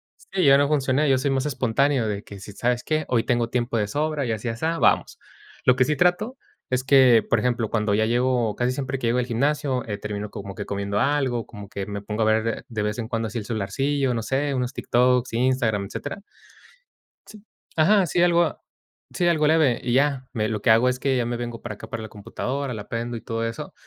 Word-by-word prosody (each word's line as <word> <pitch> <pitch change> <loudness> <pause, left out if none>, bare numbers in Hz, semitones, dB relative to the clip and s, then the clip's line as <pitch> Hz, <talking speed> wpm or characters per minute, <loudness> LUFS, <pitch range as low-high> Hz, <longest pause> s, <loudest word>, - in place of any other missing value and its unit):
Sí, 190 -3 -2
yo 140 0 +7
no 140 0 +2
funcioné, 145 0 +2
yo 135 - +4
soy 130 +2 0
más 135 0 0
espontáneo 135 -2 +1
de 105 -1 -3
que 100 - -11
si, 100 +1 -10
¿sabes 120 +3 -1
qué? 155 0 0
Hoy 120 -2 +1
tengo 120 -1 +1
tiempo 120 -1 -1
de 105 -2 0
sobra 150 +2 -1
y 115 - -1
así 110 +2 -3
asá, 160 +9 -1
vamos. - - +2 0.5
Lo 125 - +5
que 130 - +4
sí 150 +3 0
trato 195 +9 +1 0.3
es 130 0 0
que, 130 -5 +6
por 115 - +3
ejemplo, 120 -1 0
cuando 105 -2 0
ya 110 +1 +2
llego, 120 -1 +1
casi 125 +1 0
siempre 135 0 -3
que 120 - -2
llego 120 +2 +2
al 125 - 0
gimnasio, 135 +1 0
eh, 105 -2 -4
termino 105 0 -5
como 100 -3 -7
que 105 - -5
comiendo 100 0 -3
algo, 135 -5 0
como 105 -2 -10
que 100 -1 -5
me 100 0 -5
pongo 105 +2 -2
a - - +2
ver 110 +1 0
de 110 -3 -4
vez 105 0 -2
en 115 -2 -4
cuando 115 -1 -1
así 110 - -5
el 105 - -4
celularcillo, 135 +5 -1
no 115 - -2
sé, 135 +5 -1
unos 125 -1 -2
TikToks, 125 0 +1
Instagram, 120 -4 +1
etcétera. 145 - -6 1.0
Sí, 215 -1 -13 0.4
ajá, 200 +6 +5
así 175 -1 +1
algo, 175 -1 +3 0.5
sí, 175 - +1
algo 155 -3 +3
leve 155 -6 +3
y 120 -1 -1
ya, 135 -1 +1
me 110 -2 -1
lo 105 -2 -3
que 115 - +1
hago 115 +3 +5
es 125 0 -2
que 135 0 +1
ya 125 -2 +1
me 120 0 -2
vengo 120 -1 -5
para 110 -3 -6
acá - - -11
para 110 - -5
la 110 - -8
computadora, 125 +6 -4
la 105 -2 -7
prendo 120 +1 -3
y - - -9
todo 115 0 -3
eso, 115 0 -6
125 Hz, 230 wpm, -24 LUFS, 110-140 Hz, 1.0 s, yo